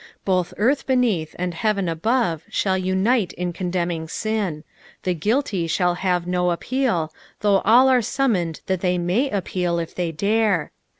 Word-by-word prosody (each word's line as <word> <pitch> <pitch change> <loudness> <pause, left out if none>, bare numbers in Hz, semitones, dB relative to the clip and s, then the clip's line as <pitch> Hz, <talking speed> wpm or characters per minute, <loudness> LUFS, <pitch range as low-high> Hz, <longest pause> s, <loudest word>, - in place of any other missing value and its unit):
Both 185 -2 0
earth 260 +7 +1
beneath 230 - +1
and 180 0 -2
heaven 200 +1 0
above 170 - 0
shall 190 -2 0
unite 190 +4 +1
in 180 -1 -3
condemning 175 -2 -2
sin; 200 -6 -2 0.4
the 180 - +1
guilty 205 - 0
shall 175 +2 +1
have 180 -1 0
no 180 0 +1
appeal, 175 -4 -1 0.3
though 200 -2 +4
all 240 +5 +6
are 255 -2 +4
summoned 210 - 0
that 185 -2 -1
they 180 -1 +1
may 185 +11 +1
appeal 180 -4 -1
if 165 -1 -4
they 175 -2 -2
dare. 200 0 +1
185 Hz, 155 wpm, -22 LUFS, 175-220 Hz, 0.4 s, all